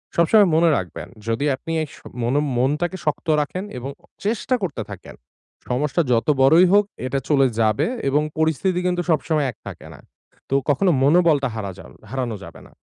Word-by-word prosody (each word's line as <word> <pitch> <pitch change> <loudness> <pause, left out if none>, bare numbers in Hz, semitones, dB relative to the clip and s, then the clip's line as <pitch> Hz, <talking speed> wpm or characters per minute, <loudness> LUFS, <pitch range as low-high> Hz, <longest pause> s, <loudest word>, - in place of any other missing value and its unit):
সবসময় 195 +4 +5
মনে 165 0 +4
রাখবেন - - -6 0.2
যদি 115 +6 0
আপনি 165 +5 -8
এই 155 - -3
স - - -16 0.3
মনো 130 +5 +1 0.2
মনটাকে 150 +8 0
শক্ত 150 +2 -2
রাখেন 180 +6 -4
এবং 130 +3 -5
অ - - -20 0.2
চেষ্টা 230 +4 0
করতে 140 -10 -3
থাকেন। 100 - -10 0.5
সমস্যা 145 +6 0
যত 115 +3 +2
বড়ই 160 +7 +6
হোক 205 0 +5 0.2
এটা 135 +1 -1
চলে 135 -3 +4
যাবে 110 - +2 0.2
এবং 145 +2 +2 0.2
পরিস্থিতি 160 +4 +1
কিন্তু 180 0 0
সবসময় 155 -2 +1
এক - - -24
থাকে - - -9
না। - - -14 0.5
তো 135 - +1
কখনো 175 +6 +3
মনোবলটা 155 -2 +4
হারা 100 -3 -4
যা - - -12 0.2
হারানো 125 -4 -3
যাবে - - -12
না। - - -22
150 Hz, 180 wpm, -21 LUFS, 130-175 Hz, 0.5 s, বড়ই